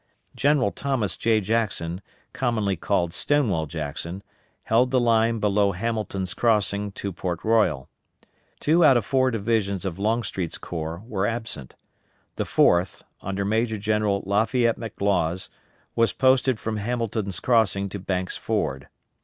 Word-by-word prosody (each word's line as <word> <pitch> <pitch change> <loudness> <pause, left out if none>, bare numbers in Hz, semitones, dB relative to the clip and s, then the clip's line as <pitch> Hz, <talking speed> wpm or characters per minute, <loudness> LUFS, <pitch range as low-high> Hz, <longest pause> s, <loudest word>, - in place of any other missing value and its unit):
General 140 -4 +2
Thomas 135 -7 -1
J. 110 -2 +2
Jackson, 100 -5 -1 0.3
commonly 110 -6 0
called 85 -1 0
Stonewall 105 - +1
Jackson, 80 +4 -5 0.4
held 120 +3 +3
the 130 0 +3
line 115 -1 +3
below 100 -1 +2
Hamilton's 100 -2 -2
crossing 105 -3 +1
to 100 -1 -5
Port 90 -1 -4
Royal. 105 - +2 0.7
Two 165 +3 +3
out 135 -5 +7
of 115 - -1
four 130 +1 +2
divisions 105 -4 -1
of 95 -1 -4
Longstreet's 100 -5 -1
corps 85 +2 -5
were 105 -4 -1
absent. 110 - -5 0.6
The - - -1
fourth, 85 +2 +2 0.2
under 100 0 -3
Major 110 +2 0
General 105 -1 0
Lafayette 115 +4 +1
McLaws, 95 -6 -1 0.5
was 115 0 +3
posted 130 -2 +3
from 110 -1 -3
Hamilton's 110 -4 -2
crossing 105 -5 +2
to 100 - -6
Banks' 95 -1 -2
Ford. 65 0 -2
105 Hz, 130 wpm, -24 LUFS, 95-115 Hz, 0.7 s, out